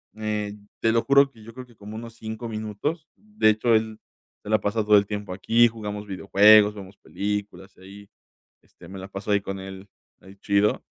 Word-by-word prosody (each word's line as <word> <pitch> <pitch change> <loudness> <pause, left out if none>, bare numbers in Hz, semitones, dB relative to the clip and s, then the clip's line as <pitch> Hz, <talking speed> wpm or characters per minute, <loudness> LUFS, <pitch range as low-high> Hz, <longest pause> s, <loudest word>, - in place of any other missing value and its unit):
eh, 105 -1 -4 0.2
te 115 - +3
lo 115 - +2
juro 140 0 +4
que 110 -3 -18
yo 115 +1 -12
creo 130 +1 -9
que 120 - -21
como 105 +1 -10
unos 115 0 -9
5 110 +1 -7
minutos, 110 - -4
de 210 - 0
hecho, 110 +2 +2
él 110 0 -1 0.4
se - - -9
la 110 0 +3
pasa 105 +2 -1
todo 105 0 +6
el 100 - +2
tiempo 105 -2 -5
aquí, 115 +5 +3
jugamos 105 -2 -7
videojuegos, 105 +2 +5
vemos 100 -1 -11
películas, 100 -1 -5
y - - -20
ahí, 100 +1 -14 0.5
este, - - -18
me 95 - -9
la 95 - -8
paso 100 +1 -5
ahí 100 - +2
con 95 0 -6
él 95 +1 -10 0.3
ahí 95 +1 -15
chido, 100 +1 0
105 Hz, 200 wpm, -24 LUFS, 100-110 Hz, 0.5 s, todo